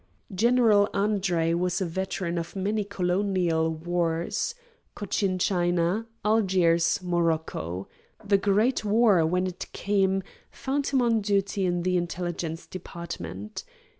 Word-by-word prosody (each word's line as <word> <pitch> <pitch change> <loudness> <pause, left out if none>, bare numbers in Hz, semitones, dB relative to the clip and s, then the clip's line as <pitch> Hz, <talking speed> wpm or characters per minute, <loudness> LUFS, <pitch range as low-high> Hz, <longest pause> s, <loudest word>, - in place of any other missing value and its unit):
General 220 -1 +4
Andre 195 -5 +1
was 180 +1 0
a 190 - 0
veteran 175 0 -2
of 165 +3 -7
many 205 +2 0
Colonial 180 -4 0
wars: 170 - -1 0.4
Cochin 195 -1 -1
China, 175 +3 +1 0.2
Algiers, 185 -6 +2
Morocco. 160 - -1 0.4
The 200 -1 +3
great 210 +6 +2
war, 210 -4 +4
when 180 +2 +1
it 185 -1 -5
came, 195 -1 +1 0.3
found 275 +1 -2
him 265 -3 +2
on 230 -2 +2
duty 200 -1 0
in 175 -1 0
the 180 0 +1
Intelligence 175 -2 -3
Department. 170 +4 -7
185 Hz, 115 wpm, -26 LUFS, 170-205 Hz, 0.4 s, General